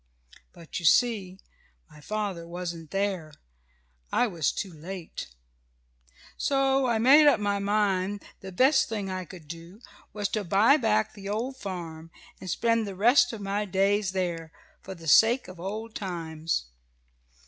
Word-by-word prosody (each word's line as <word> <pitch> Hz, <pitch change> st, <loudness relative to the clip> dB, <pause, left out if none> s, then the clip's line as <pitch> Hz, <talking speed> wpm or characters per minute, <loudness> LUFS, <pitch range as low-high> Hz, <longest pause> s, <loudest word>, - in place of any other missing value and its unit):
But 170 Hz, -1 st, -7 dB
you 170 Hz, -, -6 dB
see 200 Hz, -4 st, +3 dB, 0.5 s
my 150 Hz, -, -16 dB
father 200 Hz, -3 st, -3 dB
wasn't 170 Hz, -2 st, -6 dB
there. 195 Hz, -5 st, -2 dB, 0.8 s
I -, -, +3 dB
was 170 Hz, -9 st, 0 dB
too 190 Hz, -4 st, -5 dB
late. 170 Hz, +2 st, -7 dB, 1.1 s
"So 270 Hz, -1 st, +2 dB
I 235 Hz, -2 st, +2 dB
made 280 Hz, +7 st, +7 dB
up 280 Hz, -6 st, +5 dB
my 205 Hz, -1 st, 0 dB
mind 200 Hz, -1 st, 0 dB, 0.2 s
the 190 Hz, -, -9 dB
best 260 Hz, +10 st, +3 dB
thing 205 Hz, -4 st, -3 dB
I 185 Hz, -1 st, -4 dB
could 175 Hz, -4 st, -12 dB
do 170 Hz, +5 st, -10 dB, 0.3 s
was 205 Hz, -1 st, -2 dB
to 215 Hz, -, -2 dB
buy 200 Hz, +9 st, +5 dB
back 220 Hz, -4 st, +1 dB
the 200 Hz, -1 st, -8 dB
old 235 Hz, +6 st, -2 dB
farm, 165 Hz, -6 st, -7 dB, 0.3 s
and 185 Hz, -, -8 dB
spend 230 Hz, +3 st, +1 dB
the 195 Hz, -, -6 dB
rest 245 Hz, +5 st, +4 dB
of 225 Hz, -3 st, -7 dB
my 200 Hz, +1 st, -1 dB
days 195 Hz, +1 st, +1 dB
there, 170 Hz, -4 st, -3 dB, 0.3 s
for 190 Hz, -, -8 dB
the 165 Hz, -2 st, -11 dB
sake 230 Hz, -, +5 dB
of 185 Hz, -2 st, -11 dB
old 215 Hz, +5 st, -5 dB
times. 165 Hz, -, -3 dB
195 Hz, 150 wpm, -27 LUFS, 175-220 Hz, 1.1 s, made